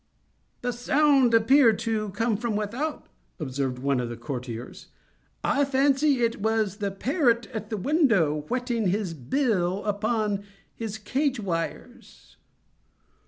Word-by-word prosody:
"The 245 0 -1
sound 270 +1 +3
appeared 230 0 +5
to 215 -2 -1
come 225 +3 0
from 225 0 -2
without," 240 +9 -3 0.3
observed 135 -3 -2
one 135 0 0
of 120 -1 -2
the 120 - -6
courtiers. 120 -1 -7 0.6
"I 285 - +2
fancy 275 -1 +2
it 230 -2 0
was 220 -2 0
the 205 -2 -1
parrot 240 - +1
at 215 -1 -5
the 220 - -2
window, 205 - +2
whetting 245 -2 -1
his 190 -1 -1
bill 190 - 0
upon 210 -1 0 0.3
his 220 -2 -5
cage 260 +5 -1
wires." 170 -5 -6
220 Hz, 125 wpm, -26 LUFS, 185-250 Hz, 0.6 s, appeared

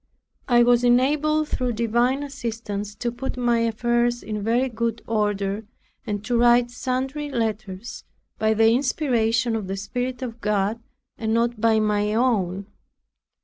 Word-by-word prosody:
I 240 -1 +5
was 245 0 +4
enabled 295 +5 +2
through 250 -1 -1
divine 235 +5 +1
assistance, 225 -7 -5
to 240 +2 -2
put 250 +2 -5
my 240 -1 +2
affairs 240 +1 +1
in 210 -1 -4
very 235 +5 +1
good 230 -1 -3
order, 205 -1 -1 0.4
and 205 -1 -3
to 240 - 0
write 240 0 +4
sundry 265 +4 -3
letters 220 -4 -4 0.4
by 220 0 +2
the 225 +1 +5
inspiration 240 -3 +1
of 215 -4 -3
the 195 +1 -3
Spirit 250 +6 -4
of 235 -2 -6
God, 210 +2 0 0.4
and 220 0 0
not 235 -1 0
by 225 -1 +4
my 210 0 +1
own. 200 -6 +1
235 Hz, 145 wpm, -23 LUFS, 215-245 Hz, 0.4 s, I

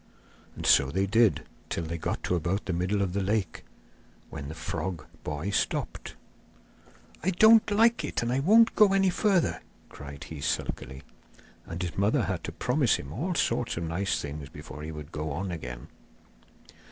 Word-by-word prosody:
And - - -6
so 70 -1 +5
they 95 +6 0
did, 110 +1 +3 0.3
till 85 - -2
they 85 +1 -4
got - - -3
to - - 0
about 90 +4 -1
the 95 - -2
middle 95 +4 0
of 90 -2 -2
the 100 - 0
lake, 100 0 -1 0.7
when 70 - -6
the 80 - -7
frog 80 0 -4 0.2
boy 75 +7 -3
stopped. - - -2 1.1
'I 185 - +2
don't 220 +5 +6
like 225 -2 +3
it, 145 - -2
and 120 +1 0
I 130 - +1
won't 225 +10 +5
go 205 -2 +6
any 195 -1 +3
further,' 190 -2 +1 0.3
cried 70 0 -9
he 80 -3 -8
sulkily. 65 -1 -3 0.6
And 85 +2 -4
his 85 -3 -4
mother 100 +2 +2
had - - -3
to - - -4
promise - - +1
him 70 +2 -7
all 170 - -2
sorts 120 - 0
of 85 - -2
nice 90 +4 -1
things 75 -1 -6
before 75 0 -10
he 80 +1 -5
would 75 0 -9
go 75 +1 -4
on 90 +6 -3
again. 60 -7 -7
90 Hz, 175 wpm, -28 LUFS, 75-125 Hz, 1.1 s, don't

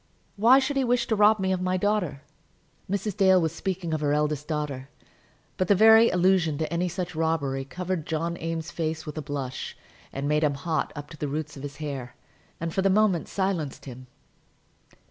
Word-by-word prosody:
Why 230 +6 +6
should 275 +1 0
he 270 - +2
wish 245 -1 +1
to 225 - 0
rob 210 +1 +5
me 190 0 0
of 185 -1 0
my 185 0 0
daughter?" 195 -7 -1 0.7
Mrs. 200 +1 -2
Dale 190 -2 +5
was 160 -2 0
speaking 180 -2 -3
of 155 - -1
her 145 -1 +1
eldest 150 -1 0
daughter; 145 -4 -3 0.7
but 185 - 0
the 205 - +5
very 220 +3 +7
allusion 180 -4 +2
to 155 +1 -3
any 175 +1 0
such 180 +1 -4
robbery 150 -4 -1
covered 180 +1 -4
John 165 +1 -2
Eames's 165 0 -3
face 160 -1 -3
with 150 +1 -5
a - - -3
blush, 140 -3 -5 0.3
made 150 +3 0
him 145 -2 +2
hot 160 +2 -2
up 145 0 -8
to 155 - -10
the 150 - -3
roots 150 +1 -4
of 135 - -9
his 145 0 -7
hair, 140 -5 -6 0.4
and 165 0 -3
for 190 - +1
the 195 - +3
moment 195 -4 +2
silenced 190 -8 -2
him. 130 -1 -10
165 Hz, 195 wpm, -26 LUFS, 150-190 Hz, 0.7 s, very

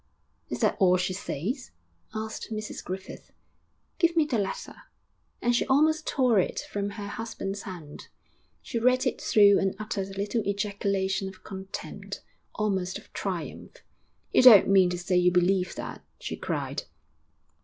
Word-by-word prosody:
'Is - - -4
that - - +2
all 185 -2 +5
she 185 +1 -1
says?' 205 - -4 0.5
asked 220 +1 -5
Mrs 215 -1 -5
Griffith. 190 +1 -7 0.7
'Give 335 -2 +3
me 315 - +5
the 250 -7 0
letter,' 195 -1 -5 0.6
and 240 0 +3
she - - +3
almost 310 +3 +3
tore 250 -6 +3
it 180 - 0
from 200 0 -2
her 205 0 -7
husband's 205 -2 -5
hand. 165 -6 -9 0.6
She 235 - -3
read 255 +3 +3
it 255 - -1
through 205 -2 +6
and 195 0 0
uttered 205 -2 -3
a 195 0 -10
little 205 +3 0
ejaculation 200 -1 -1
of 190 -1 -15
contempt 190 -1 -7 0.3
almost 190 -3 -1
of - - -16
triumph. - - -5 0.6
'You - - +5
don't 235 -6 +9
mean 190 -2 +6
to 180 - -2
say 180 +1 0
you 180 0 +4
believe 180 +1 +2
that?' - - -7
she - - -5
cried. - - -3
200 Hz, 155 wpm, -27 LUFS, 190-225 Hz, 0.7 s, don't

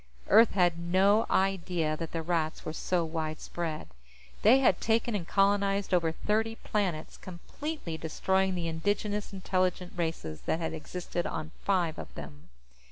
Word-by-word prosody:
Earth 225 +2 +7
had 175 -3 +2
no 190 +5 +3
idea 180 -5 +1
that 165 0 -5
the 165 -1 -3
Rats 160 -2 -1
were 155 - -3
so 175 +1 0
widespread. 160 0 -4 0.5
They 230 +5 +7
had 260 -9 +3
taken 230 +1 +1
and 185 -5 -2
colonized 200 0 +2
over 165 -2 +3
thirty 220 +6 0
planets, 185 -9 -2
completely 185 - -6
destroying 190 +4 0
the 170 -2 -2
indigenous 205 +5 -1
intelligent 185 -2 -1
races 160 - -3
that 160 - +1
had 165 -1 -2
existed 175 +2 -4
on 155 -1 -5
five 175 -5 +1
of - - -8
them. 75 -2 -10
180 Hz, 145 wpm, -30 LUFS, 160-200 Hz, 0.5 s, Earth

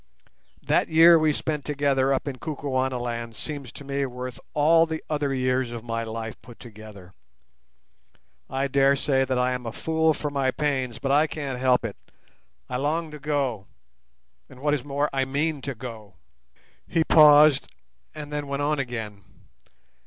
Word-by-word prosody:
That - - +1
year 165 +1 +7
we 155 -1 +3
spent 150 0 -2
together 140 -2 +1
up 135 +2 -1
in 135 -2 -4
Kukuanaland 130 -5 -3
seems 140 -2 -6
to - - -10
me 140 0 -2
worth 125 0 -7 0.2
all 165 +2 +4
the 160 -1 -5
other 145 -2 0
years 130 -1 0
of 120 -2 -7
my 115 -1 -3
life 110 0 -6
put 115 +1 -14
together. 105 -5 -12 1.4
I 135 +1 -1
dare 140 0 +3
say 135 -1 +1
that 130 -1 -1
I 125 0 +1
am 125 -1 -4
a - - -3
fool 160 +3 +1
for 150 - -4
my 135 -2 0
pains, 130 -4 -1
but 135 +1 -2
I 150 +3 +4
can't 140 -5 -5
help 125 -2 +2
it; 105 - -5 0.7
I 125 - -3
long 155 +4 -1
to 150 - -9
go, 135 -8 -2 0.8
and, 130 - -14
what 145 +2 +1
is 145 -4 -1
more, 145 +1 -1
I 135 -1 +1
mean 145 +2 -1
to 140 0 -5
go." 110 -4 -9 0.7
He 165 -1 +1
paused, 150 -2 +6 0.5
and 150 -1 -8
then 145 -1 -3
went 140 +1 -2
on 150 0 0
again. 110 -6 -5
135 Hz, 165 wpm, -25 LUFS, 125-150 Hz, 1.4 s, year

